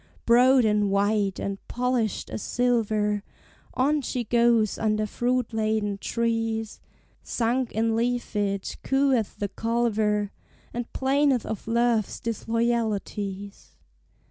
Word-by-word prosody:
Broad 250 Hz, +1 st, +5 dB
and 210 Hz, -1 st, +2 dB
white, 200 Hz, 0 st, +1 dB
and 195 Hz, 0 st, -4 dB
polished 245 Hz, -3 st, -1 dB
as -, -, -4 dB
silver, 215 Hz, -4 st, +1 dB, 0.5 s
On 290 Hz, +3 st, +2 dB
she 250 Hz, -1 st, -2 dB
goes 235 Hz, -2 st, +2 dB
under 215 Hz, -1 st, +1 dB
fruit 245 Hz, +2 st, -1 dB
laden 215 Hz, -2 st, 0 dB
trees; 225 Hz, -1 st, -2 dB, 0.4 s
Sunk 245 Hz, +1 st, -1 dB
in 225 Hz, +1 st, +1 dB
leafage 210 Hz, -4 st, -1 dB
cooeth 270 Hz, -5 st, +1 dB
the 205 Hz, -, -2 dB
culver, 215 Hz, -3 st, 0 dB, 0.4 s
And 240 Hz, 0 st, -4 dB
'plaineth 270 Hz, -2 st, +2 dB
of 220 Hz, -1 st, -5 dB
love's 230 Hz, -2 st, +1 dB
disloyalties. 220 Hz, -4 st, -2 dB
225 Hz, 105 wpm, -26 LUFS, 210-240 Hz, 0.5 s, Broad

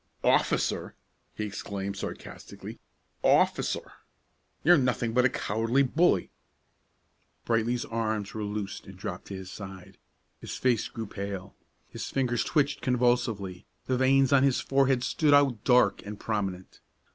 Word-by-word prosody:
"Officer!" -, -, +1 dB, 0.4 s
he 105 Hz, -, -3 dB
exclaimed 100 Hz, -1 st, -5 dB
sarcastically; -, -, -8 dB, 0.4 s
"officer! -, -, +2 dB, 0.7 s
You're 175 Hz, +3 st, +7 dB
nothing 120 Hz, -3 st, 0 dB
but 125 Hz, +1 st, +4 dB
a -, -, +5 dB
cowardly 115 Hz, +5 st, +1 dB
bully!" 140 Hz, -, +2 dB, 1.1 s
Brightly's 115 Hz, +1 st, 0 dB
arms 110 Hz, -3 st, -2 dB
were 110 Hz, -, -4 dB
loosed 105 Hz, -1 st, -5 dB
and 95 Hz, -1 st, -11 dB
dropped 95 Hz, -1 st, -6 dB
to 100 Hz, -, -7 dB
his 95 Hz, 0 st, -8 dB
side. 95 Hz, -3 st, -10 dB, 0.4 s
His -, -, -6 dB
face 125 Hz, -4 st, +1 dB
grew 115 Hz, -1 st, -6 dB
pale. 100 Hz, -2 st, -6 dB, 0.3 s
His -, -, -6 dB
fingers 125 Hz, -3 st, 0 dB
twitched 145 Hz, -3 st, +1 dB
convulsively, 120 Hz, -7 st, 0 dB, 0.2 s
the 130 Hz, -, 0 dB
veins 135 Hz, +1 st, +4 dB
on 135 Hz, -, +6 dB
his 135 Hz, -2 st, +3 dB
forehead 135 Hz, -2 st, +2 dB
stood 150 Hz, 0 st, +3 dB
out 135 Hz, -7 st, +3 dB
dark 125 Hz, -6 st, +4 dB
and 105 Hz, 0 st, -8 dB
prominent. 95 Hz, -4 st, -3 dB
115 Hz, 135 wpm, -28 LUFS, 100-130 Hz, 1.1 s, You're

